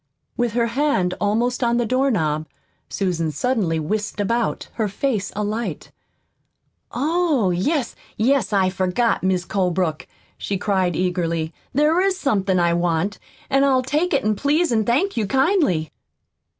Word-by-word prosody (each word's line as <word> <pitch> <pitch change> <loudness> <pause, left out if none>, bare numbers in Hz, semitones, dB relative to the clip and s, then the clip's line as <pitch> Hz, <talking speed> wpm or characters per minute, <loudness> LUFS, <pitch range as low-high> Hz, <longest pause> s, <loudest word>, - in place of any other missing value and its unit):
With 240 -3 -1
her 235 0 +2
hand 235 -7 +1
almost 235 +5 0
on 235 0 +2
the 240 - +1
doorknob 205 - 0 0.4
Susan 175 -5 -1
suddenly 185 - 0
whisked 210 +7 -3
about, 230 +3 -1
her 220 -2 -1
face 205 -1 -2
alight. 210 +3 -3 1.0
"Oh, 295 - +1
yes, 245 - -1 0.2
yes, 235 -1 +2
I 190 -2 +2
forgot, 190 +5 0
Mis' 185 -1 0
Colebrook," 180 -5 -1 0.3
she 200 - -2
cried 185 -3 0
eagerly. 170 -3 -1 0.2
"There 300 +6 +3
is 385 -1 +1
somethin' 195 - +1
I 170 -1 +2
want; 175 +3 0 0.3
an' 275 0 +2
I'll 265 -2 +3
take 300 +7 0
it, 215 -7 +1
please, 300 - +1
an' 220 -2 +2
thank 280 - +1
you 215 -3 0
kindly." 265 - +1
215 Hz, 135 wpm, -21 LUFS, 185-265 Hz, 1.0 s, There